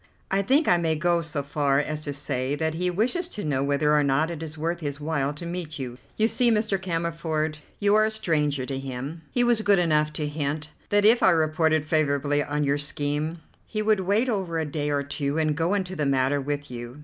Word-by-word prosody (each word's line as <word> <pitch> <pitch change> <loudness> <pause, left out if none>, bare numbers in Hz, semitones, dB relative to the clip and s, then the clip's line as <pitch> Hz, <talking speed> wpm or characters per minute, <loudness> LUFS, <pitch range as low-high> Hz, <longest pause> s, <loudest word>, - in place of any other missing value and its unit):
"I 195 +1 +2
think 275 +10 +2
I 175 - +5
may 165 -2 +1
go 170 +2 +1
so 150 -3 -3
far 140 -1 +1
as 150 +1 -1
to 145 - -4
say 135 -1 -2
that 160 +1 -1
he 180 +3 0
wishes 245 - 0
to 210 - -6
know 135 -3 0
whether 145 +2 +2
or 150 - +4
not 145 +4 +1
it 165 -2 -6
is 160 -1 -7
worth 165 +2 -2
his 145 -3 -4
while 145 -2 -1
to 150 +4 -8
meet 170 -3 -4
you. 125 -2 -6 0.2
You 220 - +3
see, 245 +1 +3
Mr. 210 -3 +1
Cammerford, 165 -3 -2 0.2
you 205 0 +3
are 215 0 +5
a - - +1
stranger 150 -10 0
to 135 0 -4
him. 135 +4 -6
He 245 - +2
was 240 -2 +3
good 205 -2 +4
enough 155 -3 +2
to 150 - -2
hint 150 0 -3 0.2
that 205 0 +3
if 230 +3 +6
I - - +6
reported 155 -1 +2
favourably 145 -2 +1
on 150 0 -1
your 140 0 +1
scheme, 145 +3 -2 0.3
he 215 -1 -2
would 215 -1 +3
wait 200 +6 +1
over 190 -8 -1
a 160 - 0
day 150 0 -2
or 145 -1 0
two 140 +1 -2
and 155 -2 +1
go 165 +5 +1
into 185 -2 -2
the 150 -4 0
matter 135 +1 +2
with 145 0 -4
you. 120 +3 -7
155 Hz, 230 wpm, -25 LUFS, 145-180 Hz, 0.3 s, if